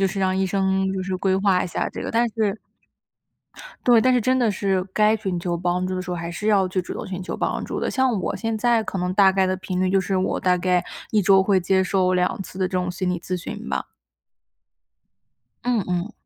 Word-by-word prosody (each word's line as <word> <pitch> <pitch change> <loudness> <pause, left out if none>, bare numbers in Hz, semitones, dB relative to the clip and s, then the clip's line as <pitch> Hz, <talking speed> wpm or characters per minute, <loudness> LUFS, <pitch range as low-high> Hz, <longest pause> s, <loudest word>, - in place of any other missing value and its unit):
就 195 - +3
是 195 - -5
让 190 -1 +1
医 190 - +1
生 190 0 0
就 190 - -3
是 185 0 -2
规 190 0 +1
划 190 -2 +2
一 - - -2
下 175 - -2
这 - - -7
个， - - -4
但 235 +1 +2
是 215 -2 0 1.3
对， 240 -2 +6
但 255 +3 +3
是 250 - +3
真 255 +3 +2
的 240 -3 +2
是 195 -2 0
该 215 +1 +3
寻 190 -5 -3
求 170 0 -2
帮 180 +1 -1
助 185 - -3
的 185 - -3
时 180 - -7
候， 175 - -2
还 170 0 -5
是 210 +5 -3
要 200 -3 +4
就 185 0 -1
主 180 - -7
动 - - -6
寻 185 -1 -5
求 - - -5
帮 - - -2
助 - - -4
的。 - - -1
像 260 -6 +1
我 - - -2
现 225 -1 -2
在 235 0 +2
可 195 - -4
能 180 0 -1
大 195 -1 +6
概 190 0 +2
的 185 0 0
频 185 -1 -4
率， 185 0 +1
就 195 0 +3
是 190 +1 -1
我， 185 - 0
大 180 -1 +2
概 180 0 +1 0.3
1 215 - +3
周 195 0 +5
会 190 -1 +2
接 190 +1 +2
受 185 0 +1
2 180 +4 0
次 185 - -11
的 185 - +1
这 180 - -9
种 180 -1 0
心 180 +1 -3
理 180 - -1
咨 185 +1 -3
询 175 - -7
吧。 65 -1 -2 1.8
嗯 240 -3 +1
嗯。 180 +4 -2
190 Hz, 260 characters per minute, -23 LUFS, 180-205 Hz, 1.8 s, 对